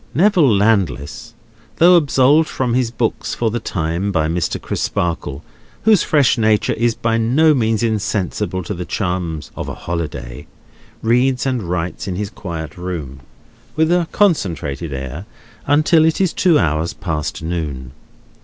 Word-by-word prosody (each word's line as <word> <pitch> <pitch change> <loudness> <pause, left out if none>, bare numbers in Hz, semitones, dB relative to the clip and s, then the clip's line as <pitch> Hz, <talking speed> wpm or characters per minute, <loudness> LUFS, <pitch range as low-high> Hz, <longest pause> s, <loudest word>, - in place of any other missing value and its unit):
Neville 175 - +4
Landless, 95 - 0 0.4
though 175 +2 +6
absolved 150 0 +4
from 125 -3 -1
his 125 -1 +1
books 115 -1 -2
for 115 -2 0
the 120 - -2
time 85 0 -2
by 80 -4 +1
Mr. 85 +1 -1
Crisparkle—whose 110 - -1
fresh 140 -5 +2
nature 110 -1 +2
is 115 0 0
by 115 0 0
no 145 +8 +4
means 115 -4 +1
insensible 105 -3 -1
to 105 - -4
the 90 -1 -5
charms 90 -5 -3
of - - -5
a - - -5
holiday—reads 110 - -3
and 130 -3 0
writes 90 0 -3
in 95 - -3
his 105 +2 -4
quiet 80 -6 -7
room, 80 -7 -5 0.6
with 160 +1 +2
a 175 -2 +2
concentrated 85 - 0
air, 65 - -6 0.4
until 155 +3 +4
it 160 0 +2
is 190 -3 +1
two 175 -5 +3
hours 80 -1 0
past 80 -3 -4
noon. 75 -7 -4
105 Hz, 140 wpm, -18 LUFS, 85-130 Hz, 0.6 s, though